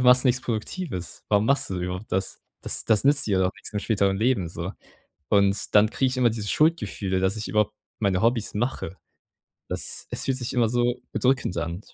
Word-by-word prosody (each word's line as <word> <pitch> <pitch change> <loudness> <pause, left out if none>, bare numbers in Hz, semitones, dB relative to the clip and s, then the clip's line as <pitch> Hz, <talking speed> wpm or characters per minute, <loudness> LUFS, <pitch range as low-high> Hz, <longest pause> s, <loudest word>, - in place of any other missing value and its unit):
du - - 0
machst 125 +1 +6
nichts 125 0 +3
Produktives. 110 - -4
Warum 105 +1 +3
machst 140 -4 +2
du 95 - -2
überhaupt 90 +3 -5
das? 95 +1 -2 0.2
Das - - -1
das 110 0 +3
nützt 140 0 +4
dir 100 -3 +2
doch 95 0 +2
nix - - -8
im 105 - -1
späteren 100 -2 +1
Leben 110 -7 +1
so.“ 85 +3 -5 0.6
Und 100 0 +2
dann 105 +1 +6
kriege 130 - +1
ich 130 - -4
immer 125 -2 +4
dieses 110 -2 -3
Schuldgefühle, 150 - +1
dass 95 +2 +1
ich 110 0 -4
überhaupt 105 -1 +1 0.3
meine 95 -3 +1
Hobbys 115 -1 +1
mache. 105 -5 -3 0.7
Das - - -2
es - - -2
fühlt 135 -1 +1
sich 125 -2 -3
immer 120 -3 +2
so 120 +1 +1 0.2
bedrückend 130 -8 +1
an. 85 +3 -3
105 Hz, 200 wpm, -25 LUFS, 95-125 Hz, 0.7 s, machst